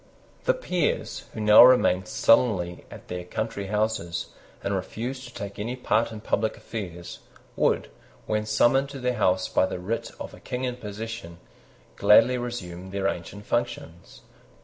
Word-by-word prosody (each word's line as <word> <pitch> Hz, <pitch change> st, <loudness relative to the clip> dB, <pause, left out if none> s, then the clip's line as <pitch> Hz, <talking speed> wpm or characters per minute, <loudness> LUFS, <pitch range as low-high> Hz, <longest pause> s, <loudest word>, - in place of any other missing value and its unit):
The -, -, +3 dB
peers, 180 Hz, -, -1 dB
who -, -, -5 dB
now 105 Hz, +1 st, +9 dB
remained 95 Hz, -7 st, +5 dB
sullenly 95 Hz, -8 st, +2 dB
at -, -, -12 dB
their 90 Hz, 0 st, -5 dB
country 100 Hz, +2 st, -4 dB
houses, 105 Hz, -5 st, -1 dB, 0.3 s
and 100 Hz, -, -1 dB
refused 120 Hz, +7 st, -4 dB
to 120 Hz, -, -14 dB
take 100 Hz, 0 st, -6 dB
any 115 Hz, +4 st, -3 dB
part 115 Hz, -2 st, +1 dB
in 110 Hz, -1 st, -8 dB
public 110 Hz, 0 st, 0 dB
affairs, 90 Hz, -6 st, -7 dB, 0.4 s
would, -, -, +1 dB, 0.3 s
when 105 Hz, 0 st, -1 dB
summoned 120 Hz, +6 st, +3 dB
to 140 Hz, -, -7 dB
their 125 Hz, 0 st, 0 dB
House 95 Hz, -5 st, +1 dB
by 95 Hz, -, +2 dB
the -, -, -4 dB
writ 100 Hz, +6 st, -3 dB
of -, -, -7 dB
a -, -, -12 dB
King 125 Hz, +1 st, -5 dB
in 125 Hz, -1 st, -2 dB
possession, 105 Hz, -5 st, -7 dB, 0.6 s
gladly 120 Hz, +4 st, +5 dB
resume 95 Hz, -7 st, -6 dB
their 100 Hz, 0 st, -1 dB
ancient 100 Hz, +4 st, -5 dB
functions. 120 Hz, -8 st, -4 dB
110 Hz, 155 wpm, -26 LUFS, 95-120 Hz, 0.6 s, now